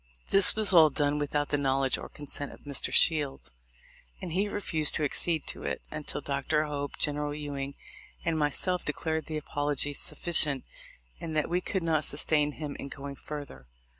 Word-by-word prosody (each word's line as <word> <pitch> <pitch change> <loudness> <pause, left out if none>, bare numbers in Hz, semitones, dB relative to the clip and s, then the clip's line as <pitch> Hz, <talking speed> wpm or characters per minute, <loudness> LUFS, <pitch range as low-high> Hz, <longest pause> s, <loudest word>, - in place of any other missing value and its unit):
This 195 -1 +5
was 215 -2 +6
all 160 -3 +8
done 145 0 0
without 145 0 -1
the 145 - 0
knowledge 135 -1 +1
or - - -8
consent 145 -1 -3
of - - -14
Mr. 140 -2 -2
Shields, 140 - +3 0.7
and 175 - -6
he 195 +5 0
refused 160 -7 0
to 155 - +1
ac 145 - -1
cede 165 -3 +1
to - - -2
it, - - -3
until 155 -1 -4
Dr. 140 +2 0
Hope, 145 -2 -4
General 145 0 -1
Ewing, 140 -2 -5 0.5
and 165 -1 0
myself 170 +5 +1
declared 160 +2 -2
the 155 - -3
apology 145 -1 0
sufficient, 145 -3 +3 0.6
and 160 -2 -5
that 150 - 0
we 180 +1 +1
could 190 -1 -2
not 160 -2 +1
sustain 150 +1 +1
him 150 -2 -6
in - - -6
going 140 0 -7
further. 140 - -9
150 Hz, 175 wpm, -29 LUFS, 140-160 Hz, 0.7 s, all